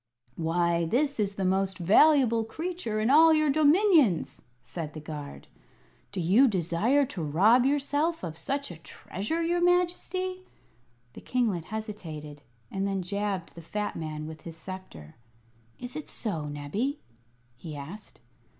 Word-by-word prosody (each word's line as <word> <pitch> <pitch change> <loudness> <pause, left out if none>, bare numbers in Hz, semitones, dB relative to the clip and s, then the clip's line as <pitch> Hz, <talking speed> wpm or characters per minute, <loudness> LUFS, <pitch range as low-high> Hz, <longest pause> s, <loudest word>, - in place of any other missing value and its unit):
"Why, 170 +1 +1
this 275 - 0
is 200 -1 0
the 190 - -2
most 190 +1 +1
valuable 230 - +5
creature 315 -3 -4
in 220 +4 +2
all 320 +3 +7
your 310 -2 +3
dominions!" 305 - +3 0.2
said 160 -3 -6
the 155 - -7
guard. 150 -2 -8 0.6
"Do 200 - -4
you 195 +11 +5
desire 205 - +2
to 195 -8 -6
rob 205 - +4
yourself 290 +4 0
of 165 -3 -5
such 275 - -3
a 170 - -9
treasure, 210 - -4
your 345 +1 +1
Majesty?" 360 +1 0 0.7
The - - -11
kinglet 220 -10 0
hesitated, 165 -9 -7 0.3
and 195 0 -1
then 195 -2 -2
jabbed 200 -1 -3
the 170 - -10
fat 210 +5 -4
man 155 -1 -5
with 155 0 -9
his 165 -1 -9
sceptre. 160 - -10 0.6
"Is 245 0 -8
it 305 - -6
so, 160 -10 -3
Nebbie?" 195 - -3 0.6
he 155 +4 -8
asked. 160 +8 -10
205 Hz, 140 wpm, -28 LUFS, -, 0.7 s, all